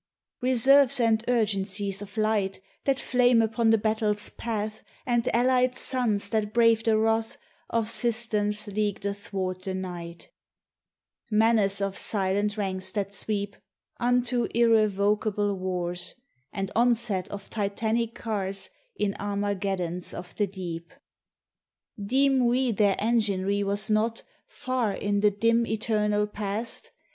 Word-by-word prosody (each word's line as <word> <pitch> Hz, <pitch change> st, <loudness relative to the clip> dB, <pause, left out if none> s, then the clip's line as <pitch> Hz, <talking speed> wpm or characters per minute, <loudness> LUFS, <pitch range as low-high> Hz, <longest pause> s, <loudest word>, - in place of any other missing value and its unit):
Reserves 260 Hz, +2 st, +5 dB
and 225 Hz, -2 st, +2 dB
urgencies 200 Hz, -4 st, 0 dB
of 205 Hz, +1 st, -10 dB
light 215 Hz, -3 st, 0 dB, 0.3 s
That 275 Hz, -1 st, +2 dB
flame 245 Hz, -2 st, +3 dB
upon 225 Hz, +1 st, +2 dB
the 225 Hz, -, +5 dB
battle's 215 Hz, -1 st, 0 dB
path, 215 Hz, -2 st, -4 dB, 0.2 s
And 240 Hz, -1 st, +1 dB
allied 250 Hz, +1 st, +3 dB
suns 225 Hz, -7 st, -1 dB
that 215 Hz, -1 st, -1 dB
brave 230 Hz, -1 st, +4 dB
the 225 Hz, -2 st, +3 dB
wrath 225 Hz, +1 st, 0 dB, 0.3 s
Of 230 Hz, -1 st, 0 dB
systems 215 Hz, -3 st, -1 dB
leagued 205 Hz, -1 st, -2 dB
athwart 195 Hz, -2 st, -3 dB
the 190 Hz, 0 st, -4 dB
night; 175 Hz, -2 st, -7 dB, 1.0 s
Menace 215 Hz, -2 st, +3 dB
of 195 Hz, -1 st, -1 dB
silent 205 Hz, +1 st, 0 dB
ranks 190 Hz, -2 st, -2 dB
that 200 Hz, -1 st, -2 dB
sweep 200 Hz, 0 st, -3 dB, 0.4 s
Unto 245 Hz, 0 st, +1 dB
irrevocable 210 Hz, -2 st, +2 dB
wars, 180 Hz, -2 st, -3 dB, 0.4 s
And 195 Hz, -1 st, -4 dB
onset 230 Hz, -5 st, +1 dB
of 200 Hz, -1 st, -8 dB
Titanic 220 Hz, +2 st, -1 dB
cars 195 Hz, -3 st, -3 dB, 0.2 s
In 205 Hz, -, -1 dB
Armageddons 195 Hz, -3 st, -2 dB
of 175 Hz, 0 st, -8 dB
the 205 Hz, -, +1 dB
Deep! 175 Hz, -2 st, -7 dB, 1.1 s
Deem 265 Hz, +4 st, +3 dB
we 250 Hz, +1 st, +2 dB
their 205 Hz, -2 st, +2 dB
enginery 205 Hz, -3 st, +1 dB
was 200 Hz, +2 st, 0 dB
not, 220 Hz, +2 st, +1 dB, 0.2 s
Far 250 Hz, -5 st, -2 dB
in 205 Hz, 0 st, -1 dB
the 210 Hz, +1 st, +5 dB
dim, 230 Hz, +3 st, +2 dB
eternal 210 Hz, -1 st, +1 dB
past? 210 Hz, +2 st, -4 dB
210 Hz, 120 wpm, -27 LUFS, 200-230 Hz, 1.1 s, Reserves